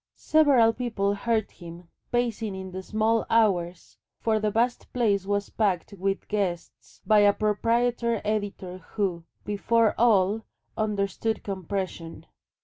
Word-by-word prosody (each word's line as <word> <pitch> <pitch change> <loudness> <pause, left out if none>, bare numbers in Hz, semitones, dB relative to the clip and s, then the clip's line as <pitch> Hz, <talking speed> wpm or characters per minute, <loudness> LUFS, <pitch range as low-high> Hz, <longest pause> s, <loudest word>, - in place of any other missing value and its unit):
Several 275 -8 +4
people 220 -5 -1
heard 220 +1 -1
him 170 0 -12 0.2
pacing 230 -4 -1
in 190 0 -7
the 190 +1 -5
small 220 +3 +1
hours 180 -6 +1 0.2
for 220 -1 +1
the 215 0 0
vast 235 +4 -1
place 205 -6 +1
was 205 0 -1
packed 200 -3 -1
with 195 0 -2
guests 190 -5 -4
by 215 -1 +5
a 205 0 +6
proprietor 230 +2 0
editor 200 -3 -3 0.2
who, 185 -6 -1 0.2
before 220 +2 +2
all 215 -2 +3 0.3
understood 210 0 -1
compression. 190 -3 -5
210 Hz, 125 wpm, -26 LUFS, 190-225 Hz, 0.3 s, a